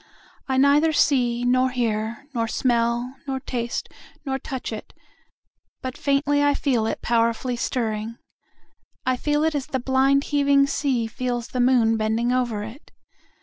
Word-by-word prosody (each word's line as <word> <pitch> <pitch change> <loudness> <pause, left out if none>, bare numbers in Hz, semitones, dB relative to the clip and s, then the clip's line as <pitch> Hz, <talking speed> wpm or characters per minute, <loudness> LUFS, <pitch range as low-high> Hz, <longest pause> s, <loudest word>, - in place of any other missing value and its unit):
I 265 -1 0
neither 290 +4 +4
see 245 -5 +2
nor 255 +1 +3
hear 230 +1 -2
nor 230 -2 0
smell 240 +1 0
nor 265 -1 -2
taste 240 -2 -3 0.4
nor 270 -1 -2
touch 260 -4 -5
it, 215 - -8 0.9
but 255 -1 -4
faintly 285 +1 +1
I 285 0 +3
feel 240 -6 +1
it - - -4
powerfully 235 +2 +1
stirring.I 230 +2 -5
feel 295 +3 0
it 320 0 +1
as 285 -3 -3
the 260 - -2
blind 265 +2 +2
heaving 280 -1 +3
sea 275 -4 0
feels 240 +1 -3
the 250 - -4
moon 245 -3 +4
bending 220 +2 0
over 240 -5 0
it. 225 +8 -11
250 Hz, 145 wpm, -23 LUFS, 235-275 Hz, 0.9 s, neither